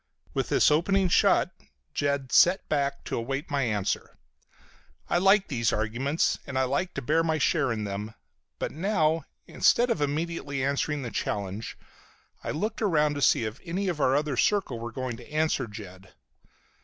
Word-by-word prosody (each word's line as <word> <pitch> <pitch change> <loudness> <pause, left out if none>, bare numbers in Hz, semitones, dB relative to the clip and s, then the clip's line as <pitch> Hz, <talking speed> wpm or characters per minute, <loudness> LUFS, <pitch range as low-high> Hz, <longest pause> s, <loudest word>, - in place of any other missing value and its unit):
With - - -1
this - - +4
opening 185 +5 +2
shot - - +4 0.4
Jed 140 -2 -1
sat 180 +2 +5
back 140 -2 -1
to - - -4
await 135 +7 -3
my 140 -1 +1
answer. 105 -6 -2 0.9
I 175 - +2
liked 195 +2 +4
these 115 -6 +1
arguments 125 +8 0
and 135 -2 -4
I 130 - +3
liked 140 +8 -1
to - - -4
bear 160 +6 +2
my 160 -1 +1
share 130 -3 +1
in 110 -2 -2
them, 105 +2 -5 0.4
but - - -3
now, 165 -2 +1 0.2
instead 240 0 +3
of 165 - -1
immediately 145 -2 -2
answering 140 +1 -1
the 120 - -5
challenge, 100 +1 -3 0.7
I - - -4
looked 215 +9 -2
around 150 -8 +2
to 145 - -4
see 115 - +4
if 110 +4 -5
any 185 +2 -1
other 140 -5 +1
of 150 +2 +1
our 140 - -1
circle 195 - +1
were 115 0 -5
going 130 0 -4
to 120 +4 -14
answer 155 -5 0
Jed. 95 -3 -11
140 Hz, 170 wpm, -27 LUFS, 120-165 Hz, 0.9 s, sat